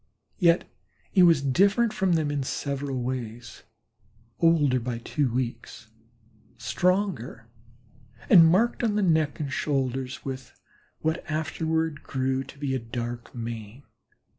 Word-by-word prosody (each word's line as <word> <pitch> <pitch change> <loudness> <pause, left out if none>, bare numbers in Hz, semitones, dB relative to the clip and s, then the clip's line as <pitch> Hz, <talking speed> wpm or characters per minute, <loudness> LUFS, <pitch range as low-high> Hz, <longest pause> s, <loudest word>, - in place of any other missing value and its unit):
Yet 170 -2 +4 0.4
he 190 - +4
was 165 -5 +5
different 200 - +3
from 190 -2 +1
them 155 -3 +1
in 145 -1 -1
several 135 -1 -3
ways 120 -2 -5 0.8
older 150 -6 +4
by 120 0 -3
two 130 +2 -1
weeks, 120 -2 -4 0.7
stronger, 180 - -1 0.8
and 170 -5 +8
marked 230 +8 +2
on 215 -3 +1
the 210 - +2
neck 160 -5 +2
and 140 -3 -3
shoulders 130 -2 -2
with 130 -1 -7 0.4
what 160 +2 -1
afterward 160 0 -1
grew 130 0 -1
to 135 - -13
be 140 -2 -2
a 130 - 0
dark 120 +1 -6
mane. 115 +1 -7
140 Hz, 125 wpm, -26 LUFS, 125-165 Hz, 0.8 s, and